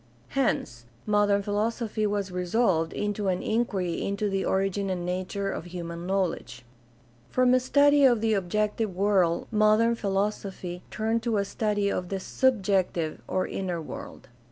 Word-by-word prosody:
Hence 120 - -1 0.2
modern 205 -1 +2
philosophy 215 +1 -1
was 200 -2 -2
resolved 180 -2 +1
into 205 -1 -2
an 185 -1 0
inquiry 200 -6 -1
into 200 +1 -1
the 195 0 0
origin 195 +1 0
and 180 -2 -2
nature 185 +2 -2
of 160 - -5
human 170 -1 -6
knowledge. 180 -10 -2 0.6
From 255 0 +3
a 255 - +5
study 285 +3 +4
of 245 -4 +5
the 220 0 +1
objective 210 +1 -1
world 190 -3 +2
modern 215 +2 +4
philosophy 195 -4 -2
turned 225 +1 -1
to 225 -2 0
a 200 - +1
study 205 0 0
of 180 -1 -3
the 195 - -2
subjective 190 -8 0
or 185 - 0
inner 180 -3 -3
world. 150 -3 -9
200 Hz, 145 wpm, -27 LUFS, 180-215 Hz, 0.6 s, a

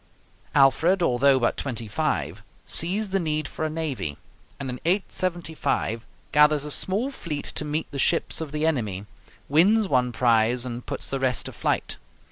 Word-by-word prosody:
Alfred, 160 +7 +4
although 135 -1 +4
but 120 - +1
twenty 115 -5 -3
five, 105 - -2 0.2
sees 195 +5 0
the 195 - +2
need 155 -3 -1
for - - -6
a - - -1
navy, 150 - -3 0.4
and 140 - -4
in 125 -1 -5
875 170 - -1 0.2
gathers 150 -1 +4
a 150 - -4
small 210 - +1
fleet 155 - -5
to - - -3
meet 150 +1 -3
the 140 - -5
ships 165 +2 +1
of 155 -3 -5
the 150 +1 -1
enemy, 110 -11 -1 0.4
wins 200 +9 +4
one 125 -5 +2
prize, 120 +1 +2
and 120 -1 -6
puts - - -4
the 135 - -2
rest 130 -1 0
to - - -5
flight. - - -2
145 Hz, 165 wpm, -25 LUFS, 125-165 Hz, 0.4 s, Alfred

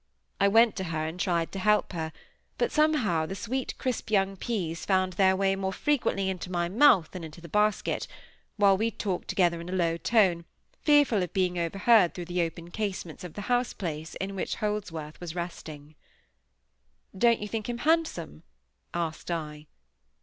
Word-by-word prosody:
I 200 - +5
went 225 +2 +5
to 190 - -2
her, 155 -2 -2
and 160 +3 -5
tried 170 -4 0
to 195 - -5
help 210 0 +2
her, 160 -2 -3 0.5
but - - 0
somehow 245 - +2
the 195 - -5
sweet 245 +6 -3
crisp 255 -4 -3
young 195 -2 +2
peas 180 -6 -3
found 185 -1 +1
their 190 +1 +4
way 195 0 +2
more 190 0 -2
frequently 240 -6 0
into 185 -1 -4
my 175 -1 0
mouth 220 - +5
than 180 -2 -7
into 160 0 -9
the 170 - -11
basket, 210 +4 0 0.5
while 200 -2 +5
we 220 +4 0
talked 195 -5 -3
together 170 -3 +1
in 170 - -8
a - - -4
low 170 -3 +1
tone, 180 -4 +2 0.4
fearful 290 -9 +4
of 180 - -3
being 180 -2 +1
overheard 195 +3 +3
through 175 - -5
the 175 +1 -1
open 170 +1 -4
casements 195 -5 -4
of 175 -3 -8
the 205 - -5
house 245 +3 0
place 160 -3 -5
in 195 +1 -4
which 190 - -2
Holdsworth 180 -8 -4
was 170 -1 -6
resting. 155 -4 -7 1.2
"Don't 235 +4 +4
you 210 - -4
think 220 +1 -4
him 240 - -2
handsome?" 300 - 0 0.5
asked 165 -1 -3
I. 150 -3 -4
190 Hz, 180 wpm, -28 LUFS, 170-210 Hz, 1.2 s, I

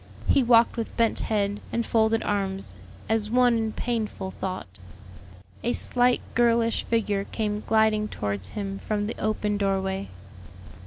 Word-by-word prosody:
He 275 - +4
walked 235 -1 +4
with 230 - -4
bent 230 -1 +3
head 205 -1 0
and 235 0 -1
folded 225 0 +2
arms, 195 - 0 0.3
as 220 -1 0
one 245 0 +4
in 225 -1 0
painful 215 -5 -3
thought. 185 - -6 0.8
A 240 - +1
slight 245 0 +2
girlish 230 -1 +3
figure 205 -3 0
came 210 -1 -2
gliding 220 -1 +3
towards 100 - -4
him 195 -1 -3
from 210 -1 -2
the 220 - -4
open 210 -1 0
doorway. 195 -1 -1
215 Hz, 140 wpm, -26 LUFS, 200-230 Hz, 0.8 s, He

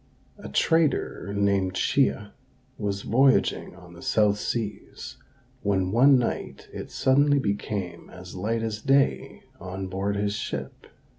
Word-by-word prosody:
A - - -8
trader 160 - +1
named 100 -2 +1
Chia 105 -1 +1 0.4
was 100 -2 -3
voyaging 130 -5 +2
on 90 -1 -14
the 85 - -13
south 105 -1 +2
seas, 110 -2 -5 0.4
when 95 -2 0
one 130 +5 +6
night 120 -2 -3
it - - -7
suddenly 145 +2 +3
became 100 -6 -3
as 90 0 -11
light 110 +5 -2
as 110 -1 -3
day 135 +2 +1 0.2
on 95 +1 -6
board 100 +2 -2
his 100 0 -1
ship. 110 - -6
100 Hz, 130 wpm, -26 LUFS, 95-120 Hz, 0.4 s, one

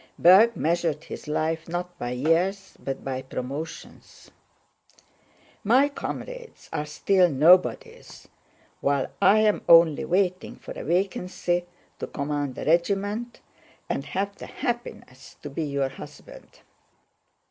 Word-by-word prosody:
(Berg 210 +6 +6
measured 165 -2 0
his - - -9
life 160 +2 -2
not 175 +1 -4
by 120 - -3
years 170 +10 0
but 135 -1 -4
by 130 -1 -3
promotions.) 135 +5 -8 1.3
"My 255 +7 +4
comrades - - -7
are 150 - -2
still 180 +4 +2
nobodies, 185 - +2 0.5
while 140 -1 0
I 205 +3 +6
am 215 -1 +2
only 165 -3 +6
waiting 185 0 0
for - - -11
a - - -6
vacancy 175 0 -1 0.3
to - - -4
command 145 -2 -3
a - - -5
regiment, 200 +8 0 0.5
and - - -2
have 200 +1 -3
the - - -9
happiness 240 - -6
to 145 - -7
be 155 +3 -3
your 140 -2 -1
husband." 135 - -13
175 Hz, 120 wpm, -25 LUFS, 150-200 Hz, 1.3 s, Berg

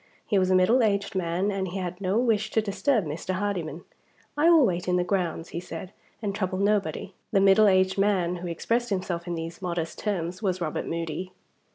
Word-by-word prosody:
He 205 - +2
was 185 0 +2
a 185 - +4
middle 220 +8 +4
aged 200 -3 +1
man, 185 +2 0
and 195 -1 -2
he 185 +2 -5
had 180 0 -4
no 190 +2 +1
wish 220 -3 +2
to 220 - +3
disturb 215 - +1
Mr. 165 +5 -3
Hardyman. 180 -5 -3 0.5
"I 305 +3 +4
will 325 -5 +7
wait 180 -4 -1
in 180 - +2
the 180 - +2
grounds," 175 -3 -2
he 170 - -4
said, 180 +2 -8 0.3
"and 200 -2 -1
trouble 185 -2 -2
nobody." 200 -1 0 0.2
The 200 - +3
middle 195 +2 +6
aged 190 0 +3
man, 185 -3 +2
who 175 +1 -6
expressed 230 +8 -1
himself 185 -3 -2
in 175 - -2
these 165 +2 -6
modest 170 -3 -3
terms, 180 -3 -2
was 185 -3 0
Robert 160 -3 -3
Moody. 170 +3 -4
185 Hz, 205 wpm, -26 LUFS, 175-205 Hz, 0.5 s, will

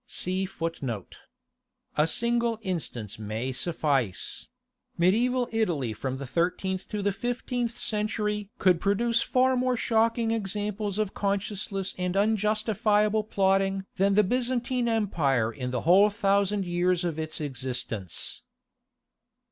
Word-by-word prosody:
(19) 185 +1 -1 1.5
A 150 +1 +3
single 235 +3 +1
instance 130 - -4
may 110 +4 -3
suffice—Mediæval 170 - -1
Italy 170 - 0
from 130 +4 -4
the 140 - -6
thirteenth 180 +6 -1
to 210 -1 -3
the 200 - +2
fifteenth 240 +2 -2
century 210 -1 -1
could 180 -3 +3
produce 230 +4 +2
far 260 +1 +3
more 250 0 +1
shocking 225 0 +2
examples 210 -1 -2
of 215 -2 -1
conscienceless 200 -1 -2
and 180 +1 -1
unjustifiable 215 0 +2
plotting 195 -1 +1
than 195 +1 +3
the 210 - +6
Byzantine 245 +2 0
Empire 145 - +1
in 125 +2 -4
the 125 -1 -2
whole 190 +5 +6
thousand 200 -1 +1
years 175 0 +1
of 165 -3 -2
its 155 0 -3
existence. 125 - -3
200 Hz, 115 wpm, -27 LUFS, 170-220 Hz, 1.5 s, the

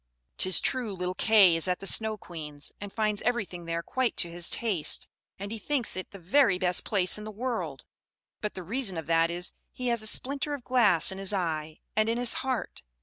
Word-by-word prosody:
"'Tis 185 -2 +6
true 245 -6 0
little 180 0 -3
Kay 195 -3 +5
is 165 +2 -1
at 180 0 0
the - - -8
Snow 220 +2 +3
Queen's, 150 -6 -7
and 205 -1 -7
finds 215 -1 0
everything 205 -8 -2
there 165 0 -3
quite 260 +3 -1
to 170 - +1
his 170 0 +2
taste; 200 -10 0 0.3
and 200 +1 -6
he 225 - -5
thinks 270 -1 -1
it 185 - -6
the 200 - -11
very 195 +3 +3
best 180 -1 -1
place 195 -1 +2
in - - -8
the 215 - -7
world; 210 - -4 0.6
but 210 - -4
the 185 - -6
reason 205 -2 -1
of 160 - -5
that 165 +1 +2
is, 175 +1 -1 0.2
he 250 -1 -3
has 235 -2 +1
a 215 - -1
splinter 280 +5 -1
of 270 - -11
glass 215 -10 +4
in 190 - -7
his 195 +1 +2
eye, 160 -4 -2 0.2
and 215 +1 +2
in 230 - 0
his 245 -1 +2
heart. 260 -2 -3
200 Hz, 215 wpm, -28 LUFS, 175-230 Hz, 0.6 s, Tis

